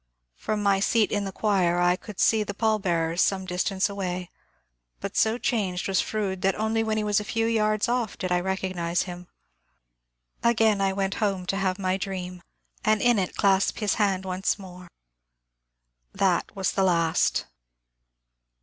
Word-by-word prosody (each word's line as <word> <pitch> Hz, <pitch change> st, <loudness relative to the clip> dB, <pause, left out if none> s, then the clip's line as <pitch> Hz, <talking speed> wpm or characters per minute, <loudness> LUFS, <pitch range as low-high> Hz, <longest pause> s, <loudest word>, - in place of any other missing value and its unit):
From 210 Hz, -, -3 dB
my 200 Hz, -1 st, +3 dB
seat 215 Hz, +2 st, +2 dB
in 205 Hz, -1 st, 0 dB
the 195 Hz, -, -4 dB
choir 185 Hz, -4 st, +1 dB
I 175 Hz, 0 st, +3 dB
could 205 Hz, +1 st, -11 dB
see 220 Hz, -1 st, +4 dB
the 205 Hz, -1 st, -4 dB
pall 220 Hz, -1 st, +1 dB
bearers 170 Hz, -2 st, 0 dB
some 190 Hz, -1 st, +1 dB
distance 185 Hz, +2 st, 0 dB
away, 185 Hz, -3 st, -4 dB, 0.7 s
but -, -, -6 dB
so 220 Hz, +2 st, +2 dB
changed 200 Hz, -7 st, -1 dB
was 195 Hz, -2 st, +2 dB
Fronde 195 Hz, -4 st, -3 dB
that 195 Hz, 0 st, +2 dB
only 220 Hz, +1 st, 0 dB
when 220 Hz, -1 st, -1 dB
he 215 Hz, -, 0 dB
was 210 Hz, 0 st, +2 dB
a -, -, -4 dB
few 225 Hz, +2 st, -1 dB
yards 215 Hz, -1 st, +1 dB
off 240 Hz, -3 st, -1 dB
did 185 Hz, -, -3 dB
I 180 Hz, -, +3 dB
recognize 185 Hz, -2 st, -1 dB
him. 180 Hz, -1 st, -8 dB, 1.1 s
Again 220 Hz, -3 st, +3 dB
I 195 Hz, 0 st, +2 dB
went 195 Hz, 0 st, -1 dB
home 195 Hz, -3 st, 0 dB
to 195 Hz, -, -1 dB
have 190 Hz, -1 st, 0 dB
my 185 Hz, -1 st, 0 dB
dream, 185 Hz, -2 st, -5 dB, 0.4 s
and 215 Hz, 0 st, +3 dB
in 240 Hz, -1 st, +3 dB
it 185 Hz, -, -2 dB
clasp 195 Hz, -1 st, +2 dB
his 210 Hz, -3 st, 0 dB
hand 190 Hz, -2 st, +1 dB
once 185 Hz, +2 st, -1 dB
more. 180 Hz, -2 st, -11 dB, 1.3 s
That 190 Hz, +1 st, +1 dB
was 195 Hz, -1 st, 0 dB
the 195 Hz, -, 0 dB
last. 170 Hz, -3 st, +2 dB
195 Hz, 170 wpm, -26 LUFS, 185-215 Hz, 1.3 s, see